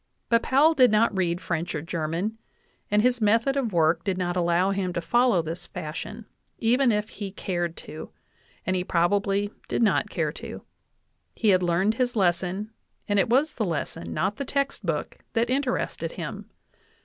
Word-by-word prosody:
But 230 Hz, -1 st, +4 dB
Powell 290 Hz, +7 st, +4 dB
did 255 Hz, -5 st, +6 dB
not 215 Hz, 0 st, +3 dB
read 175 Hz, -2 st, 0 dB
French 170 Hz, -1 st, -3 dB
or 150 Hz, -, -2 dB
German, 170 Hz, +7 st, -2 dB, 0.5 s
and 210 Hz, +1 st, +3 dB
his 245 Hz, -1 st, +2 dB
method 230 Hz, +6 st, +3 dB
of 260 Hz, -6 st, 0 dB
work 165 Hz, -1 st, +2 dB
did 190 Hz, -2 st, -1 dB
not 175 Hz, -1 st, -1 dB
allow 175 Hz, +2 st, +2 dB
him 190 Hz, -2 st, -1 dB
to 175 Hz, -, -1 dB
follow 240 Hz, -1 st, +3 dB
this 170 Hz, +2 st, -6 dB
fashion, 155 Hz, +8 st, -6 dB, 0.3 s
even 245 Hz, +2 st, +3 dB
if 210 Hz, 0 st, -1 dB
he 205 Hz, -, -6 dB
had 195 Hz, 0 st, -8 dB
cared 175 Hz, -3 st, -2 dB
to, 155 Hz, -, -8 dB, 0.6 s
and 185 Hz, -, 0 dB
he 180 Hz, -, 0 dB
probably 195 Hz, +3 st, +1 dB, 0.2 s
did -, -, +1 dB
not 220 Hz, -, +2 dB
care -, -, -1 dB
to. -, -, -8 dB, 0.7 s
He 220 Hz, -, +2 dB
had 185 Hz, -2 st, +5 dB
learned 180 Hz, +4 st, +2 dB
his 245 Hz, +1 st, -1 dB
lesson, 190 Hz, +2 st, 0 dB, 0.4 s
and 205 Hz, -1 st, +2 dB
it 195 Hz, -, +2 dB
was 275 Hz, +6 st, +3 dB
the 225 Hz, -, -2 dB
lesson, 145 Hz, -, -3 dB
not 190 Hz, -, -1 dB
the 280 Hz, -, -2 dB
text 275 Hz, -4 st, -1 dB
book, 165 Hz, -5 st, -3 dB
that 235 Hz, +2 st, +1 dB
interested 265 Hz, -1 st, -1 dB
him. -, -, -6 dB
200 Hz, 180 wpm, -26 LUFS, 175-230 Hz, 0.7 s, did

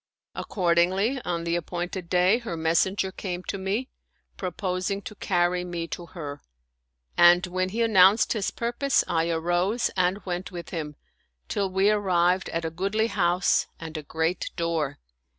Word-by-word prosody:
Accordingly, 185 Hz, +7 st, +1 dB
on 170 Hz, -1 st, -2 dB
the 170 Hz, 0 st, 0 dB
appointed 175 Hz, +1 st, -4 dB
day 185 Hz, +6 st, +4 dB
her 225 Hz, -9 st, -5 dB
messen 165 Hz, +4 st, +2 dB
ger 190 Hz, -2 st, -1 dB
came 185 Hz, -2 st, -5 dB
to 195 Hz, -, -4 dB
me, 200 Hz, +7 st, -1 dB, 0.5 s
proposing 185 Hz, +1 st, -3 dB
to 210 Hz, -, -7 dB
carry 180 Hz, -3 st, 0 dB
me 170 Hz, -2 st, -4 dB
to 175 Hz, -, -6 dB
her; 145 Hz, -5 st, -7 dB, 0.7 s
and 175 Hz, +1 st, +6 dB
when 185 Hz, +1 st, -1 dB
he 230 Hz, +4 st, 0 dB
announced 200 Hz, -1 st, +5 dB
his 210 Hz, -4 st, -1 dB
purpose 240 Hz, +4 st, 0 dB
I 165 Hz, -1 st, +1 dB
arose 175 Hz, +7 st, 0 dB
and 185 Hz, +1 st, +2 dB
went 180 Hz, +1 st, -4 dB
with 175 Hz, -2 st, -8 dB
him, 150 Hz, -4 st, -4 dB, 0.5 s
till 200 Hz, -1 st, -1 dB
we 190 Hz, +2 st, +3 dB
arrived 185 Hz, -3 st, +2 dB
at 165 Hz, 0 st, -3 dB
a 160 Hz, -, -2 dB
goodly 200 Hz, +6 st, 0 dB
house 175 Hz, -1 st, +2 dB
and 160 Hz, -1 st, -8 dB
a 155 Hz, -, -3 dB
great 160 Hz, +4 st, -2 dB
door. 165 Hz, -5 st, -1 dB
180 Hz, 155 wpm, -26 LUFS, 170-195 Hz, 0.7 s, and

